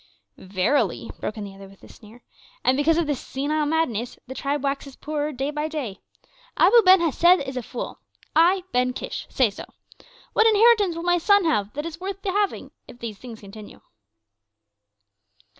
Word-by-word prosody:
'" 100 - -51 0.2
"Verily," 185 - +1
broke 215 - -4
in 210 - -5
the 200 -1 -8
other 195 0 -12
with 195 0 -19
a - - -13
sneer, 225 +2 -16 0.4
"and 255 - +3
because 305 +4 +2
of 340 - +1
this 290 -4 -2
senile 295 +3 -2
madness 250 -7 -1
the 260 - -8
tribe 285 +2 -2
waxes 275 -1 -3
poorer 300 0 -3
day 270 +1 -3
by 300 +1 -2
day. 280 -11 -5 0.6
Abu 470 +3 +6
Ben 375 -2 +6
Hesed 345 +3 +4
is 265 - -5
a 250 - -2
fool! 240 +1 -7 0.4
I, 355 +4 +4
Ben 250 0 +1
Kish, - - -6
say 250 -6 +2
so. - - -9 0.7
What 445 - +4
inheritance 430 -4 +4
will 335 - -5
my 350 0 +2
sons 405 +2 +4
have 210 -11 0
that 295 +2 -4
is 330 0 -7
worth 390 +1 -5
the 385 - -1
having 410 +1 -1 0.2
if - - -13
these 225 -4 -7
things 235 -3 -10
continue?" 205 +1 -12
290 Hz, 185 wpm, -24 LUFS, 235-340 Hz, 0.7 s, Abu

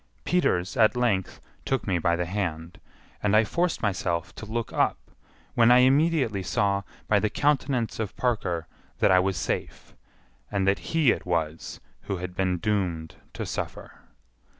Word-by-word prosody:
Peters 95 - +1
at 110 -1 +4
length 105 -7 0 0.2
took 135 -3 -1
me 95 -4 0
by 85 0 +2
the 90 +1 -1
hand, 85 -3 -4 0.4
and 105 0 +2
I 110 - +6
forced 170 +8 -1
myself 90 -4 -1
to 110 - -9
look 115 +1 -3
up, - - +2 0.6
when 115 0 +5
I 125 +1 +7
immediately 135 - +3
saw 100 +1 0 0.3
by 105 - +4
the 110 - 0
countenance 135 -5 0
of 110 -3 -4
Parker 95 -9 -1 0.3
that - - +3
I 90 - +6
was 95 -1 0
safe, - - -4 0.5
and 95 -1 0
that 100 - +3
he 160 -7 +4
it - - -4
was 80 -2 -2 0.3
who 95 - -1
had 90 0 -6
been 95 -1 0
doomed 90 -6 -1 0.2
to - - -4
suffer. - - -6
100 Hz, 160 wpm, -26 LUFS, 90-120 Hz, 0.6 s, I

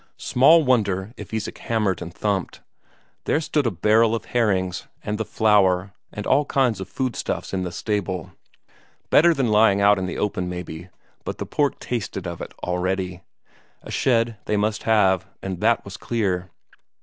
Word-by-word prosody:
Small 155 +6 +5
wonder 105 -6 +1
if - - -10
Isak 110 -2 -4
hammered 105 -6 -1
and 85 - -6
thumped. 95 0 -2 0.6
There - - +2
stood 150 -4 0
a - - +3
barrel 110 +4 +3
of 115 - -5
herrings, 95 -6 0 0.2
and 105 +1 -3
the - - +1
flour, 95 -4 +2 0.2
and 105 - -6
all 145 - +3
kinds 125 -9 +1
of 95 - -7
food 130 -3 -2
stuffs - - -4
in 95 - 0
the 90 -1 -3
stable; 95 -2 -3 0.8
better 170 +3 +6
than 135 -7 +1
lying 105 -2 +4
out 100 0 +5
in 95 - -2
the 90 - -4
open, 90 -3 -1
maybe, 90 -1 -7 0.3
but - - -5
the - - -4
pork 145 -2 0
tasted 100 -6 -4
of 85 -1 -5
it - - -6
already; 90 0 -2 0.6
a - - -9
shed 115 -3 +1
they 105 - 0
must 105 +1 0
have, 95 -4 +3 0.2
and 95 -2 -4
that 115 +2 +2
was 100 +1 -8
clear. 95 -7 -1
105 Hz, 175 wpm, -23 LUFS, 95-115 Hz, 0.8 s, better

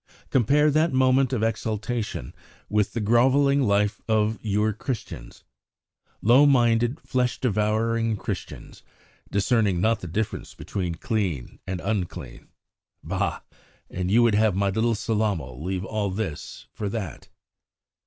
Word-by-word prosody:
Compare 145 +5 +4
that 155 +3 +2
moment 130 0 +3
of 120 -4 0
exaltation 110 - -2 0.4
with 105 -1 +1
the 120 - -2
grovelling 135 +6 +3
life 105 -3 +1
of 110 0 +1
your 105 0 +1
Christians! 110 - -6 0.8
Low 125 +7 +6
minded, 120 0 +3
flesh 125 -1 -1
devouring, 110 0 0
Christians, - - -7 0.5
discerning 100 -2 +1
not 110 +3 +2
the 90 - -7
difference 100 +6 -3
between 90 -4 -4
clean 90 - -3
and 95 -1 -3
unclean! 90 - -4 0.6
Bah! - - -2 0.5
And 90 0 -2
you 115 +4 +5
would 115 -2 +4
have 105 -2 +3
my 100 0 +1
little 115 +3 +1
Sellamal 100 - -2
leave 95 +2 -3
all 105 -1 -2
this 95 -6 -5
for 105 - -3
that!" 100 -6 -6
110 Hz, 125 wpm, -25 LUFS, 100-120 Hz, 0.8 s, Low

